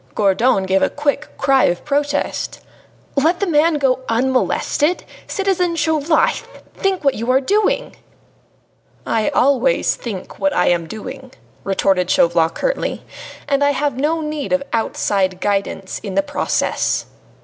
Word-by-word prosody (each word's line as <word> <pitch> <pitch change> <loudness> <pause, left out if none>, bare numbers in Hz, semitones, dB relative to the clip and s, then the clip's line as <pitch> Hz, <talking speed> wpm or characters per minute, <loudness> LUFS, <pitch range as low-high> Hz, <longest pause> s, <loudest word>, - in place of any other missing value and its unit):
Gourdon 200 +1 +2
gave 190 0 +1
a - - +3
quick 290 0 -1
cry 270 -1 +3
of 175 - -1
protest. 290 0 -1 0.6
"Let 320 +5 +2
the 400 - +1
man 325 -1 +3
go 270 -3 +1
unmolested? 265 +6 +1 0.2
Citizen 370 -3 0
Chauvelin, 315 -1 +2 0.4
think 385 -3 -1
what 275 -2 +3
you 230 +1 -4
are 260 +1 +5
doing!" 405 +9 0 1.1
"I 220 -1 +1
always 265 -1 +2
think 205 -6 -7
of - - -21
what 290 0 +1
I - - +3
am 170 -2 0
doing," 260 +6 -8 0.3
retorted 190 -2 +1
Chauvelin 170 -1 +3
curtly, - - -2 0.4
"and 280 -1 +1
have 285 -1 +1
no 305 +5 0
need 300 -2 -4
of 275 0 +1
outside 195 -4 0
guidance 195 -1 -2
in 200 -3 -6
the 295 - +3
process." 290 0 -1
275 Hz, 140 wpm, -19 LUFS, 210-300 Hz, 1.1 s, are